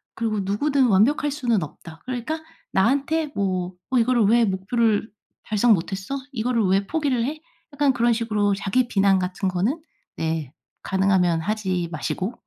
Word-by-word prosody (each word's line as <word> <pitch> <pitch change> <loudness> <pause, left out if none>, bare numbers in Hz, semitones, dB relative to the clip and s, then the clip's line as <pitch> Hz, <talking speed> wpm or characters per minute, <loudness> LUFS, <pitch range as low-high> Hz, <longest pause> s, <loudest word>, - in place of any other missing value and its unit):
그리고 220 -2 -1
'누구든 260 +8 +1
완벽할 245 +8 +3
수는 240 - 0
없다.' 160 +2 -11
그러니까 255 +5 -3 0.3
나한테 280 +9 +1
뭐 185 -2 -1 0.2
어 260 - +3
이거를 240 0 +3
'왜 235 +3 +4
목표를 210 +3 0 0.3
달성 215 +2 +3
못했어? 195 +6 -3 0.2
이거를 235 -2 0
왜 195 +1 +2
포기를 280 -7 0
해?' 305 +3 -4 0.3
약간 285 -1 +2
그런 235 -1 +2
식으로 210 -3 0
자기 220 +6 0
비난 195 -3 +3
같은 185 +1 -2
거는 205 - -1 0.3
네 160 -4 -2 0.3
가능하면 190 -3 +2
하지 185 -3 -2
마시고 185 - -3
215 Hz, 320 characters per minute, -23 LUFS, 190-250 Hz, 0.3 s, 왜